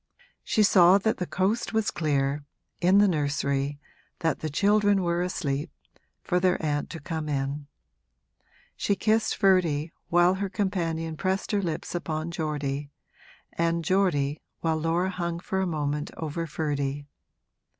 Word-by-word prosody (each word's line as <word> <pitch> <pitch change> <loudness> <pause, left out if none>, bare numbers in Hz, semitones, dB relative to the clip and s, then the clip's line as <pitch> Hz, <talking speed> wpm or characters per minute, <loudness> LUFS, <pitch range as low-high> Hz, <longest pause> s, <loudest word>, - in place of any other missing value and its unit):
She 215 - +2
saw 185 -2 +7
that 220 +2 0
the 180 - -3
coast 200 +6 0
was 220 -1 +1
clear, 145 -2 0 0.4
in 185 +3 +4
the 205 0 +6
nursery 140 -3 0 0.4
that 165 -1 0
the 155 - -3
children 205 +4 +3
were 170 0 0
asleep, 150 -4 -2 0.5
for 180 -2 +1
their 180 0 +3
aunt 145 -1 -1
to 165 - -7
come 160 -1 -4
in. 140 +1 -2 1.1
She 200 - 0
kissed 220 +2 +1
Ferdy 170 -6 +3 0.2
while 175 +1 +5
her 195 +1 -2
companion 165 -5 -2
pressed 190 +2 -1
her 205 -2 +1
lips 165 -4 -3
upon 165 -1 -3
Geordie, 145 -3 -3 0.6
and 170 0 0
Geordie 160 -7 +1 0.2
while 160 -1 +1
Laura 165 +4 0
hung 170 -2 -3
for 190 +2 -2
a 190 - 0
moment 150 -2 -2
over 165 +1 -3
Ferdy. 145 -2 -2
165 Hz, 140 wpm, -27 LUFS, 150-185 Hz, 1.1 s, saw